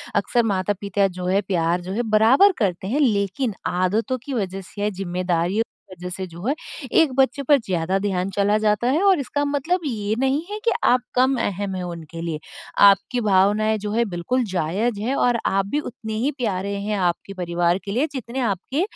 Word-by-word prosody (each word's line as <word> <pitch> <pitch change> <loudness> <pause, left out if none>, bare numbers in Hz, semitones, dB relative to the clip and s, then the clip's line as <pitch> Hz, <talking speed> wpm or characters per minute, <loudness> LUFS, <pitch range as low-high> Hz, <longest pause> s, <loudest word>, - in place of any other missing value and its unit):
अक्सर 240 -1 +2
माता-पिता 200 -1 0
जो 180 -1 -7
है 195 +2 +2
प्यार 175 -3 0
जो 180 +2 -7
है 225 +5 -1
बराबर 265 - +6
करते 190 -3 -1
हैं 275 +8 0
लेकिन 215 -1 +1 0.2
आदतों 210 +8 0
की 280 - -4
वजह 195 -5 -2
से 205 +2 -10
या 205 - +1
ज़िम्मेदारियों 180 +1 -1 0.3
की - - -10
वजह 180 0 -7
से 190 - -4
जो 170 +2 -10
है 275 - +3 0.5
एक 315 -5 +2
बच्चे 270 +1 +2
पर 285 +2 +5
ज़्यादा 180 0 0
ध्यान 190 -2 -1
चला 205 +1 +3
जाता 215 +2 +1
है 310 +6 +2
और 385 -4 +5
इसका 285 +1 -2
मतलब 290 +6 0
ये 215 -5 -1
नहीं 270 +3 +1
है 420 - -4
कि 465 - +4
आप 250 0 +4
कम 260 +2 +4
अहम 200 -1 -2
हैं 185 - -3
उनके 170 -2 -7
लिए। 165 -2 -3 0.5
आपकी 220 +5 +3
भावनाएँ 210 +2 +3
जो 205 0 -4
है 230 +2 +2
बिल्कुल 205 +7 -1
जायज़ 200 +6 0
है 250 +5 -1
और 245 -3 +2
आप 195 0 +1
भी 285 +9 -1
उतने 230 -6 -6
ही 290 - +2
प्यारे 200 -4 -2
हैं 210 +1 -2
आपके 180 +1 -1
परिवार 175 -1 0
के 200 - -4
लिए 255 +9 +1
जितने 255 -1 -5
आपके 235 - -1
205 Hz, 200 wpm, -22 LUFS, 185-250 Hz, 0.5 s, बराबर